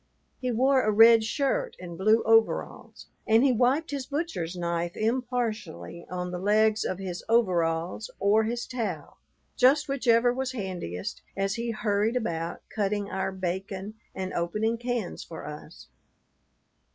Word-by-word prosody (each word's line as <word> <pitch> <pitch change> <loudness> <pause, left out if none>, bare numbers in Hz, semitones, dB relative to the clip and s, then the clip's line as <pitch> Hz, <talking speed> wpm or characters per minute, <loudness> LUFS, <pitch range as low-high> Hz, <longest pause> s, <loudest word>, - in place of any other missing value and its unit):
He 255 - -2
wore 260 +3 +3
a 215 - +1
red 225 +1 +7
shirt 290 - -1
and 175 -2 -8
blue 215 +5 +3
overalls, 225 0 +1 0.2
and 225 +2 +5
he 275 - +5
wiped 255 +7 +2
his 275 -3 -4
butcher's 280 - -3
knife 170 0 -2
impartially 225 - -2
on 180 0 -4
the 180 - -4
legs 215 +2 +3
of 185 - -2
his 185 -2 -5
overalls 180 -4 +1
or 210 +2 +3
his 235 +2 -2
towel, 240 -4 -5 0.4
just 285 +4 +4
whichever 245 -3 +3
was 260 0 -3
handiest 180 - -5 0.2
as 195 0 0
he 235 +2 -3
hurried 215 0 0
about 170 -8 -3
cutting 205 -1 -1
our 190 0 -1
bacon 190 +2 -4 0.2
and 185 -1 -4
opening 215 +7 -1
cans 240 -5 -3
for 165 - -9
us. 150 +3 -10
215 Hz, 140 wpm, -27 LUFS, 185-245 Hz, 0.4 s, red